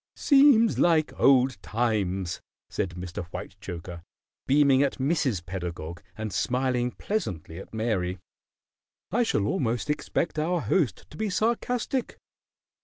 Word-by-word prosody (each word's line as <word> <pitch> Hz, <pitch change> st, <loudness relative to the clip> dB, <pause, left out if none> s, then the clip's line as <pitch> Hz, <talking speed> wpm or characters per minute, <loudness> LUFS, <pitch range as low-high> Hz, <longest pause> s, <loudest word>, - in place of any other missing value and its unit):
"Seems 275 Hz, -6 st, +5 dB
like 160 Hz, -3 st, +3 dB
old 130 Hz, -5 st, +4 dB
times," 100 Hz, -6 st, -1 dB, 0.3 s
said 90 Hz, -2 st, -2 dB
Mr. 90 Hz, 0 st, -5 dB
Whitechoker, 85 Hz, 0 st, -7 dB, 0.5 s
beaming 140 Hz, -1 st, +5 dB
at 140 Hz, -1 st, +1 dB
Mrs. 130 Hz, -, 0 dB
Pedagog 85 Hz, -2 st, -5 dB, 0.2 s
and 110 Hz, -3 st, -4 dB
smiling 125 Hz, +5 st, 0 dB
pleasantly 95 Hz, -, -4 dB
at -, -, -11 dB
Mary. 105 Hz, -5 st, -1 dB, 0.9 s
"I 235 Hz, +5 st, +2 dB
shall 105 Hz, -, +1 dB
almost 120 Hz, +5 st, 0 dB
expect 155 Hz, +1 st, -1 dB
our 170 Hz, +2 st, 0 dB
host 160 Hz, -6 st, 0 dB
to -, -, -11 dB
be 220 Hz, -1 st, -1 dB
sarcastic." 235 Hz, +4 st, -1 dB
125 Hz, 115 wpm, -27 LUFS, -, 0.9 s, Seems